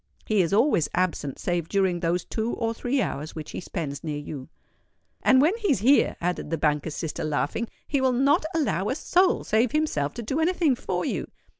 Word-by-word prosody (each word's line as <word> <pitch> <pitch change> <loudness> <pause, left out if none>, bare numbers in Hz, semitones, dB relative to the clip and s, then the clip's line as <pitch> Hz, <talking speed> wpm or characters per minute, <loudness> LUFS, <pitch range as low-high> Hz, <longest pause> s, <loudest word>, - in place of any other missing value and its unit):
He 215 -3 +2
is 170 - 0
always 205 - +3
absent 170 -6 -1
save 175 -2 -2
during 190 -3 +1
those 170 0 0
two 225 +1 -2
or 230 -1 -1
three 245 +2 0
hours 155 -3 -5
which 155 -2 -7
he - - -5
spends 155 -6 -5
near 150 -2 -3
you." 145 -2 -7 0.7
"And 260 - +5
when 340 +8 +3
he 435 -3 -1
is 230 - +1
here," 270 +6 +4
added 175 -2 -2
the 165 - -1
banker's 150 0 0
sister, 160 -1 -4
laughing, 155 +9 -1 0.2
"he 280 -3 0
will 260 -1 +3
not 270 +5 +3
allow 215 - 0
a 260 - 0
soul 365 +4 +2
save 220 +2 +1
himself 225 - 0
to 235 - -5
do 270 +8 -2
any 330 +3 +2
thing 325 -6 +2
for 185 -7 -3
you. - - -2
195 Hz, 205 wpm, -25 LUFS, 160-265 Hz, 0.7 s, And